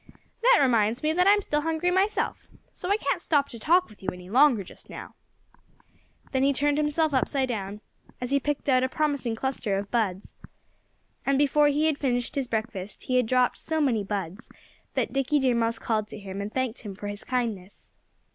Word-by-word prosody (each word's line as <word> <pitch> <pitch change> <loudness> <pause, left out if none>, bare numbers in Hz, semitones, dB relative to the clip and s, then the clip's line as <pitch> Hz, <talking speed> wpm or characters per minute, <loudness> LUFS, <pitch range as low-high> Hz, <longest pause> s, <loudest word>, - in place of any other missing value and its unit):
"That - - +6
reminds 235 -2 +2
me 310 +1 +2
that 360 +3 +3
I'm 410 0 +5
still 295 -3 0
hungry 325 +3 0
myself. 380 +3 0 0.3
So 360 - -6
I 405 - +3
can't - - -1
stop 285 -3 +1
to 235 - -9
talk 350 +9 +3
with 215 - -18
you 190 - -2
any 180 +1 -11
longer 255 -4 +5
just - - -15
now." - - -9 1.2
Then 265 - +1
he 280 +1 +3
turned 290 +2 +1
himself 300 +1 +1
upside 265 0 +1
down, 205 -2 -4 0.4
as 250 +1 -4
he 280 - +3
picked 290 +1 -3
out 255 -2 +4
a 260 - +1
promising 285 -6 -1
cluster 225 -5 -2
of 200 0 -5
buds. 205 -5 -1 0.9
And 275 0 +2
before 290 +1 +4
he 295 +2 +2
had 310 -3 +1
finished 245 -3 -1
his 275 -3 -1
breakfast 220 -4 -4
he 255 - +1
had 250 -3 +2
dropped 250 +1 +2
so 320 0 -1
many 245 -8 +1
buds 195 0 -5 0.5
that - - -1
Dickie 275 +2 +1
Deer 265 -3 +2
Mouse 230 0 0
called 215 -2 -1
to 215 - -8
him 195 -1 -6
and 205 +1 -5
thanked 260 -2 -2
him 205 -4 -7
for 205 +1 -7
his 205 0 -5
kindness. 225 -7 -4
255 Hz, 200 wpm, -26 LUFS, 215-295 Hz, 1.2 s, That